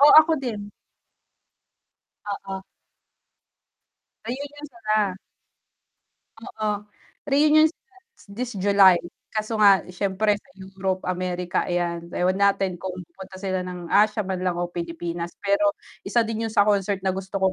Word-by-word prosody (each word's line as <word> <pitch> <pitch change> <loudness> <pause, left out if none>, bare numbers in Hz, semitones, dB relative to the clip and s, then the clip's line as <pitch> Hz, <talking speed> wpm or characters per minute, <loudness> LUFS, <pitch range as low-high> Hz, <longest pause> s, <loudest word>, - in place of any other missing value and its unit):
Oh, 290 +1 +9
ako 320 +1 +2
din. 210 -5 -5 1.6
Oo. 195 -1 -5 1.6
Reunion 285 +5 -6
sila. 215 -2 -2 1.5
Oo, 215 -1 -4 0.6
reunion 305 +2 +5
sila 375 - -50 0.4
this 245 0 -3
July 195 -2 +6 0.3
kaso 215 +1 -2
nga 200 -4 +6
syempre 200 +3 0
sa 270 +6 -22
Europe, 190 0 -3
Amerika 180 -1 -1
ayan, 175 -1 -1
ewan 185 +2 +1
natin 195 -2 +2
kung 185 +1 -5
pupunta 190 +3 -12
sila 185 -2 -2
ng 180 -2 -7
Asia 215 +1 +4
man 190 -1 -3
lang 180 - +2
o 175 - -2
Pilipinas, 170 0 -5
pero 200 0 +2 0.3
isa 235 +4 +2
din 225 0 -2
yun 220 - -5
sa 215 - +5
concert 200 -1 +1
na 190 - 0
gusto 190 +1 -3
ko 190 - +4
195 Hz, 130 wpm, -24 LUFS, 185-215 Hz, 1.6 s, Oh